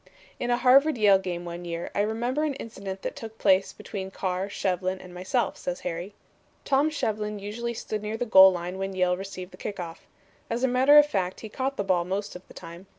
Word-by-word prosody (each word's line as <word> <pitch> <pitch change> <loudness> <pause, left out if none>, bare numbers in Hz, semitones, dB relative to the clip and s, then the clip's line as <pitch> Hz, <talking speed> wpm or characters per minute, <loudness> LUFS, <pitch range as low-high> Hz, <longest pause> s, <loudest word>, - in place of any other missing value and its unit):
"In 245 - -2
a 240 - +3
Harvard 270 +3 +5
Yale 205 -3 +5
game 175 -2 -4
one 175 0 -6
year 170 0 -5
I - - -2
remember 240 +7 -1
an 295 -3 -1
incident 195 -6 -7
that - - -4
took 220 -1 -9
place 195 -2 +3
between 190 -2 -7
Carr, 190 0 -3
Shevlin 185 -1 -1
and 180 -1 -12
myself," 185 +7 -1
says 180 0 -4
Harry. 180 +3 -5 0.5
"Tom 280 +2 +3
Shevlin 215 -7 -2
usually 230 +4 -4
stood 215 -1 -4
near 215 +1 -4
the 245 - -2
goal 190 -4 +8
line 180 +1 -5
when 195 0 -3
Yale 180 -1 +2
received 185 -1 -7
the - - -13
kick 200 -2 -6
off. 170 -2 -8 0.4
As 235 +2 -2
a - - +5
matter 260 +4 +6
of 295 - +9
fact 190 -9 -2
he 220 - -7
caught 265 +4 -3
the 200 - 0
ball 185 -3 +2
most 195 +3 -4
of 180 - -8
the - - -14
time. 170 +3 -10
200 Hz, 220 wpm, -26 LUFS, 185-235 Hz, 0.5 s, of